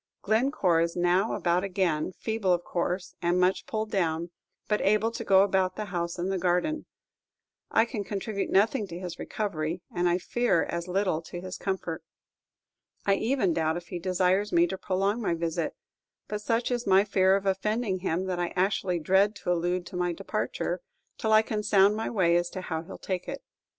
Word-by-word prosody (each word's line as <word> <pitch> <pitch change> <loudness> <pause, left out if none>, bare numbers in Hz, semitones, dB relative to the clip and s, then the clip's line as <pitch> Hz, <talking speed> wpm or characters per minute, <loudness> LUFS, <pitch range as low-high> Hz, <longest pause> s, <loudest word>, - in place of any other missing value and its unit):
Glencore 215 - +2
is 170 0 -1
now 180 +4 +2
about 175 +1 +1
again, 180 -5 0
feeble 220 -3 -1
of 175 0 0
course, 180 +1 -2
and 175 +1 +2
much 185 +1 +2
pulled 215 -1 -3
down, 170 -3 0 0.4
but 210 - +1
able 215 +3 +2
to 230 0 -5
go 195 -2 +6
about 190 -2 +1
the 215 - -4
house 170 0 -2
and 180 +2 -1
the 190 - -1
garden. 180 - 0 0.8
I 225 - +4
can 230 -4 -4
contribute 200 0 -3
nothing 210 +2 +2
to 170 - -7
his 175 -1 -6
recovery, 170 -4 -3
and 175 0 +2
I 175 - +2
fear 240 0 +1
as 170 +1 -4
little 185 -3 0
to 175 +2 -8
his 185 0 -6
comfort. 190 -4 -3 1.0
I 200 - +4
even 220 -3 +1
doubt 160 0 0
if 175 0 -9
he 175 - -4
desires 185 +3 +1
me 170 0 +5
to 190 - -2
prolong 195 +4 0
my 185 -6 0
visit; 165 -1 -2 0.5
but 210 0 -4
such 230 +3 0
is 240 -2 -1
my 195 +1 +6
fear 190 -2 +3
of 200 0 -2
offending 195 +1 0
him, 180 0 -1
that 185 -2 -2
I 175 -1 -2
actually 185 -1 +1
dread 190 +6 +3
to 180 - -1
allude 175 +1 -1
to - - -9
my 175 -1 0
departure, 165 - -3 0.4
till 220 -4 0
I 215 0 +6
can 215 -1 -2
sound 205 -1 +4
my 220 - -2
way 180 -6 +3
as 175 0 0
to - - -3
how 160 -3 -3
he 165 - -12
'll - - -7
take 185 -2 -4
it. - - -6
185 Hz, 195 wpm, -28 LUFS, 175-210 Hz, 1.0 s, go